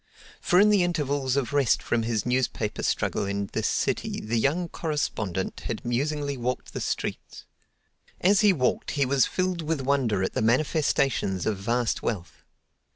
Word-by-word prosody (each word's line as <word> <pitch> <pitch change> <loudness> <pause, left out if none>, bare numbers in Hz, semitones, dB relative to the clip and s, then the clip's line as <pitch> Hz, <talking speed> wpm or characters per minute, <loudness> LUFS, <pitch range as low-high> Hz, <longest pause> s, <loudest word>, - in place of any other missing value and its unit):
For 180 - +3
in 210 +1 +6
the 205 -3 +4
intervals 145 -6 0
of 140 -2 -1
rest 140 -5 +2
from 120 - 0
his 110 -2 -1
newspaper 125 -4 -1
struggle 100 - 0
in 100 0 -3
this - - 0
city - - -1
the 115 +2 -1
young 160 +9 +1
correspondent 110 - -3
had 115 - -4
musingly 140 +3 -1
walked 125 +1 -3
the - - -4
streets. - - -4 0.7
As 195 +2 +4
he 210 -2 +6
walked 130 -8 0
he 140 - +3
was 135 -1 +3
filled 185 -2 -1
with 160 -2 -1
wonder 130 -8 +1
at - - -2
the - - -1
manifestations 130 - +1
of 110 -3 0
vast 120 +3 0
wealth. 100 -7 -4
130 Hz, 160 wpm, -26 LUFS, 115-150 Hz, 0.7 s, in